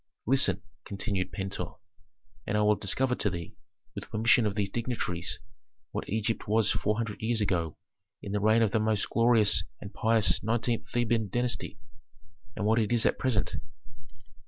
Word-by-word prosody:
"Listen," 110 Hz, -6 st, +3 dB, 0.2 s
continued 100 Hz, -2 st, -2 dB
Pentuer, 95 Hz, -3 st, -4 dB, 0.7 s
"and 105 Hz, -, 0 dB
I 105 Hz, -, +3 dB
will 105 Hz, 0 st, +5 dB
discover 125 Hz, +6 st, 0 dB
to 105 Hz, -, 0 dB
thee, 85 Hz, -2 st, -6 dB, 0.4 s
with -, -, -8 dB
permission 115 Hz, +1 st, +3 dB
of 100 Hz, -, -3 dB
these 100 Hz, -2 st, -1 dB
dignitaries, 105 Hz, -7 st, -2 dB, 0.5 s
what -, -, -5 dB
Egypt 110 Hz, +2 st, -1 dB
was 110 Hz, 0 st, +3 dB
four 105 Hz, 0 st, 0 dB
hundred 115 Hz, -2 st, -4 dB
years 115 Hz, +1 st, +1 dB
ago 85 Hz, -7 st, -1 dB, 0.4 s
in 100 Hz, -, -7 dB
the 105 Hz, -, 0 dB
reign 110 Hz, +2 st, +4 dB
of 110 Hz, -, +1 dB
the 110 Hz, -, +2 dB
most 110 Hz, -1 st, +1 dB
glorious 110 Hz, -8 st, +4 dB, 0.2 s
and 100 Hz, 0 st, -9 dB
pious 110 Hz, 0 st, +2 dB
nineteenth 115 Hz, 0 st, -1 dB
Theban 115 Hz, -3 st, 0 dB
dynasty, 120 Hz, -1 st, -1 dB, 0.8 s
and 105 Hz, -, -2 dB
what 110 Hz, +2 st, +3 dB
it 110 Hz, 0 st, 0 dB
is 120 Hz, -1 st, +2 dB
at -, -, +2 dB
present. 125 Hz, -6 st, 0 dB
110 Hz, 160 wpm, -29 LUFS, 100-115 Hz, 0.8 s, will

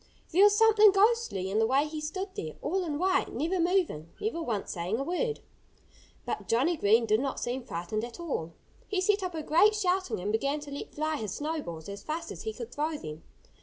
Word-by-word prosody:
There 365 Hz, +4 st, +5 dB
was 410 Hz, 0 st, +7 dB
something 435 Hz, -1 st, +7 dB
ghostly 400 Hz, -, +2 dB
in 210 Hz, -, +1 dB
the 220 Hz, -, +3 dB
way 270 Hz, +4 st, +3 dB
he 305 Hz, 0 st, -5 dB
stood 375 Hz, +6 st, -4 dB
there, 155 Hz, -1 st, -5 dB
all 370 Hz, +5 st, 0 dB
in 305 Hz, -4 st, -2 dB
white, 375 Hz, +3 st, +1 dB
never 335 Hz, +8 st, 0 dB
moving, 340 Hz, -, +1 dB
never 415 Hz, -6 st, -2 dB
once 225 Hz, -10 st, -2 dB
saying 180 Hz, +4 st, -2 dB
a 270 Hz, -, -2 dB
word. 440 Hz, -, -1 dB, 0.8 s
But -, -, -4 dB
Johnnie 270 Hz, +10 st, +2 dB
Green 225 Hz, -3 st, +4 dB
did 215 Hz, 0 st, +3 dB
not 270 Hz, 0 st, -2 dB
seem 245 Hz, +2 st, -2 dB
frightened 175 Hz, +5 st, -3 dB
at 235 Hz, +4 st, -7 dB
all. 170 Hz, -, -3 dB, 0.3 s
He 400 Hz, -, -1 dB
set 400 Hz, +2 st, +2 dB
up 365 Hz, -2 st, -3 dB
a 315 Hz, -, -3 dB
great 375 Hz, +9 st, +5 dB
shouting 375 Hz, -, 0 dB
and 200 Hz, +3 st, -2 dB
began 275 Hz, +7 st, 0 dB
to 290 Hz, -1 st, -9 dB
let 280 Hz, -, -7 dB
fly 310 Hz, +1 st, -1 dB
his 215 Hz, -6 st, -4 dB
snowballs 290 Hz, -, -4 dB
as 200 Hz, 0 st, -7 dB
fast 330 Hz, +2 st, -4 dB
as -, -, -7 dB
he 440 Hz, -, -3 dB
could 465 Hz, -, -7 dB
throw 305 Hz, +1 st, -1 dB
them. 155 Hz, -, -8 dB
305 Hz, 215 wpm, -29 LUFS, 220-375 Hz, 0.8 s, was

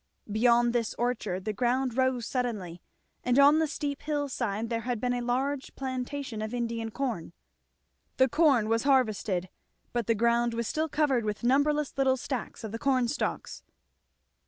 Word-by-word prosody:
Beyond 235 Hz, +2 st, +4 dB
this 235 Hz, -2 st, -1 dB
orchard 215 Hz, -6 st, -2 dB
the 215 Hz, -, -1 dB
ground 250 Hz, +2 st, 0 dB
rose 260 Hz, -3 st, +1 dB
suddenly, 210 Hz, -10 st, -3 dB, 0.4 s
and 250 Hz, +1 st, +2 dB
on 285 Hz, +2 st, +7 dB
the 320 Hz, -, +2 dB
steep 290 Hz, -1 st, -4 dB
hill 290 Hz, -1 st, -2 dB
side 225 Hz, -3 st, -2 dB
there 230 Hz, 0 st, 0 dB
had 245 Hz, -1 st, -2 dB
been 245 Hz, +2 st, 0 dB
a 245 Hz, -, -1 dB
large 260 Hz, +3 st, -2 dB
plantation 260 Hz, -2 st, -4 dB
of 215 Hz, +3 st, -3 dB
Indian 230 Hz, -1 st, -2 dB
corn. 225 Hz, -9 st, -3 dB, 0.8 s
The 260 Hz, -, +5 dB
corn 275 Hz, -6 st, +3 dB
was 225 Hz, +1 st, +2 dB
harvested, 215 Hz, -9 st, +1 dB, 0.5 s
but 240 Hz, -3 st, -1 dB
the 230 Hz, -, +3 dB
ground 235 Hz, +1 st, +2 dB
was 235 Hz, -1 st, -2 dB
still 315 Hz, +1 st, -1 dB
covered 280 Hz, -6 st, +1 dB
with 210 Hz, +1 st, -3 dB
numberless 285 Hz, +3 st, +2 dB
little 265 Hz, -1 st, +3 dB
stacks 250 Hz, -2 st, -5 dB
of 220 Hz, -, -5 dB
the 230 Hz, -, -5 dB
corn 255 Hz, -3 st, +2 dB
stalks. -, -, -3 dB
245 Hz, 165 wpm, -28 LUFS, 230-270 Hz, 0.8 s, on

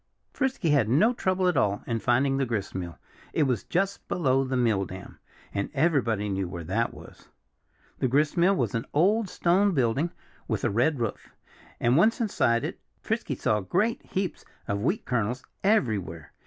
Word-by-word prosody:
Frisky 255 Hz, -, 0 dB
had 130 Hz, -7 st, +3 dB
no 195 Hz, -, +4 dB
trouble 185 Hz, -5 st, 0 dB
at 180 Hz, -, +2 dB
all 105 Hz, -5 st, +1 dB
in 115 Hz, -1 st, -1 dB
finding 135 Hz, +4 st, +2 dB
the 135 Hz, -, +1 dB
gristmill. 95 Hz, -6 st, -4 dB, 0.4 s
It 155 Hz, -, +2 dB
was 125 Hz, -6 st, 0 dB
just 195 Hz, +3 st, -1 dB
below 135 Hz, -6 st, +2 dB
the 130 Hz, -1 st, -2 dB
mill 110 Hz, -5 st, +2 dB
dam. 95 Hz, 0 st, -9 dB, 0.3 s
And 100 Hz, -, -2 dB
everybody 135 Hz, -, +1 dB
knew 95 Hz, -2 st, -2 dB
where 85 Hz, -2 st, -6 dB
that 110 Hz, +8 st, 0 dB
was. -, -, -14 dB, 0.7 s
The -, -, +2 dB
gristmill 155 Hz, +8 st, +3 dB
was 175 Hz, -, -1 dB
an 115 Hz, -1 st, -2 dB
old 200 Hz, +6 st, +3 dB
stone 185 Hz, +3 st, +2 dB
building 135 Hz, +5 st, +1 dB, 0.4 s
with -, -, -2 dB
a -, -, +1 dB
red 130 Hz, +7 st, +1 dB
roof. 115 Hz, -4 st, -4 dB, 0.5 s
And 120 Hz, +3 st, +3 dB
once 220 Hz, +6 st, +4 dB
inside 120 Hz, -, +1 dB
it -, -, -4 dB, 0.2 s
Frisky -, -, -2 dB
saw 105 Hz, -, +1 dB
great 190 Hz, -, 0 dB
heaps 190 Hz, -1 st, -3 dB, 0.2 s
of 100 Hz, 0 st, -1 dB
wheat 175 Hz, -, 0 dB
kernels 125 Hz, +1 st, -1 dB, 0.2 s
everywhere. 105 Hz, -, 0 dB
130 Hz, 170 wpm, -27 LUFS, 110-180 Hz, 0.7 s, no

